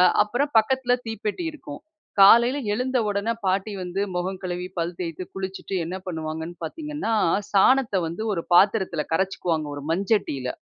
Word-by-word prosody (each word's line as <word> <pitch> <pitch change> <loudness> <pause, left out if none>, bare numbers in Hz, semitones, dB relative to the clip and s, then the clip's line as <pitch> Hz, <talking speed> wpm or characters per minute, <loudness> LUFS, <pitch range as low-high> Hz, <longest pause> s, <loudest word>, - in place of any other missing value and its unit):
அ - - +7 0.2
அப்பறம் 275 +7 -2
பக்கத்தில 245 +2 +1
தீப்பெட்டி 225 - -3
இருக்கும். 145 - -9 0.4
காலையில 235 +7 +7
எழுந்த 255 +4 0
உடனே 205 +2 0
பாட்டி 190 +3 0
வந்து 180 +2 -3 0.2
மொகம் 185 +1 -3
கழுவி, 180 0 -3
பல் 170 +1 -2
தேய்த்து, 170 0 -4
குளிச்சுட்டு 190 0 -5
என்ன 180 +3 -4
பண்ணுவாங்கன்னு 160 0 -5
பாத்தீங்கன்னா, 300 - -3 0.4
சாணத்த 240 +3 +4
வந்து 170 +6 -5
ஒரு 170 - -3
பாத்திரத்தில 190 -4 +3
கரைச்சிக்குவாங்க 170 -3 -1
ஒரு 145 - -7
மண்சட்டியில. 185 - 0
190 Hz, 140 wpm, -24 LUFS, 175-230 Hz, 0.4 s, அ